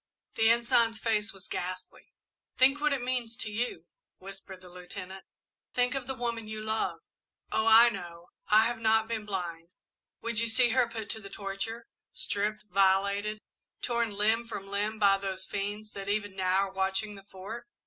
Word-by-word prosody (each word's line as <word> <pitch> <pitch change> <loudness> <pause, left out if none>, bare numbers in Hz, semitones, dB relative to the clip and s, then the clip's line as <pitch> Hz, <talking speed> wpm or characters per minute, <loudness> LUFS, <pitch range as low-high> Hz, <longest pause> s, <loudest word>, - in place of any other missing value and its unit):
The 225 0 +4
Ensign's 235 -1 +3
face 220 -1 0
was 190 -1 -12
ghastly. 185 +1 -5 0.5
"Think 270 +3 +5
what 300 0 +3
it 270 -3 0
means 245 -2 -2
to 215 - -4
you," 235 +4 -2 0.3
whispered 195 -1 -10
the 185 - -12
Lieutenant. 180 +1 -9 0.5
"Think 250 0 +3
of 270 -3 -3
the 265 - -3
woman 235 -3 -3
you 215 0 -5
love! 220 0 -1 0.5
Oh, 220 +1 +1
I 225 +2 +9
know 170 -5 -8 0.2
I 215 +1 +6
have 240 0 -1
not 220 0 +3
been 220 -2 -3
blind. 170 -4 -4 0.5
Would 230 -1 +2
you 230 0 +2
see 245 +1 +4
her 245 0 +3
put 220 -3 -4
to 220 - -6
the 195 - -9
torture, 195 +3 -5 0.3
stripped, 210 +1 -2
violated, 200 +2 +2 0.4
torn 235 -2 +1
limb 220 +3 +2
from 195 -3 -6
limb 205 +2 -1
by 200 -2 +5
those 190 -1 -4
fiends 205 +1 -4
that 200 0 -6
even 205 -1 -1
now 185 -1 +1
are - - -15
watching 190 +2 0
the 195 -1 -12
Fort? 200 +5 -8
215 Hz, 175 wpm, -30 LUFS, 195-230 Hz, 0.5 s, I